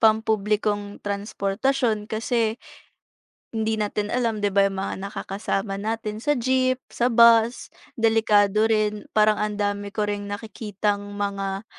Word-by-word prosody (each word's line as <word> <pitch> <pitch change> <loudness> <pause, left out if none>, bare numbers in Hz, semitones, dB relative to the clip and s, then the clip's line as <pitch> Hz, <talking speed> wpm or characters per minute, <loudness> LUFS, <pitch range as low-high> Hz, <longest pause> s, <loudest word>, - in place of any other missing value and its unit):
pampublikong 210 -2 +1
transportasyon 210 +3 -1
kasi, 225 0 0 1.0
hindi 220 0 0
natin 210 0 -2
alam, 230 -3 0
'di 205 - +3
ba, 200 0 +4
'yong 195 -1 -3
mga 190 - -3
nakakasama 195 0 -3
natin 215 0 -3
sa 295 +5 +1
jeep, 255 +1 +1
sa 240 - 0
bus, 235 0 +5 0.3
delikado 220 -2 +3
rin. 210 -1 0
Parang 215 0 +5
ang 210 0 -1
dami 205 0 -2
ko 210 - 0
ring 205 0 -3
nakikitang 205 -1 -3
mga, 200 0 -3
210 Hz, 125 wpm, -24 LUFS, 205-225 Hz, 1.0 s, bus